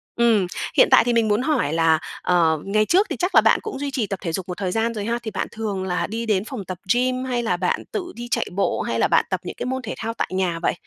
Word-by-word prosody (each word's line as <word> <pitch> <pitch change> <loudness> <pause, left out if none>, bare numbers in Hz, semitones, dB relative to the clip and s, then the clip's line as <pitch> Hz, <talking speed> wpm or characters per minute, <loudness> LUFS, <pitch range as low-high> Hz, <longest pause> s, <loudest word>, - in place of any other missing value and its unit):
ừm, 225 -5 +3 0.3
hiện - - +7
tại - - +7
thì 240 - +1
mình 230 -1 +3
muốn 210 +2 +2
hỏi 260 - 0
là, 165 -1 +3 0.2
ờ, 165 -3 +2
ngày 215 +2 +2
trước 375 - +3
thì - - -2
chắc 360 +2 -1
là - - +9
bạn - - +4
cũng 430 -10 -6
duy 285 0 -3
trì 245 -5 -1
tập 195 -1 -4
thể 170 - -3
dục 180 +3 -4
một 180 - -4
thời 190 -3 -2
gian 225 +3 0
rồi 210 -2 -4
ha, 235 +2 -1
thì 220 - -4
bạn 195 - -2
thường 210 -4 -3
là 180 -1 -1
đi 225 +2 -4
đến 210 -3 +1
phòng 225 -6 -6
tập 185 0 -6 0.2
gym 255 +1 0
hay 245 -2 -1
là 180 -6 0
bạn 180 0 -1
tự 360 -3 -4
đi 240 0 -7
chạy - - +1
bộ, 200 - 0
hay - - -2
là - - +3
bạn - - +3
tập - - -1
những - - -6
cái - - -4
môn 260 +1 -2
thể 230 - -5
thao 225 0 -3
tại - - -2
nhà 185 -3 -1
vậy? 170 - +1
215 Hz, 300 wpm, -22 LUFS, 185-240 Hz, 0.3 s, là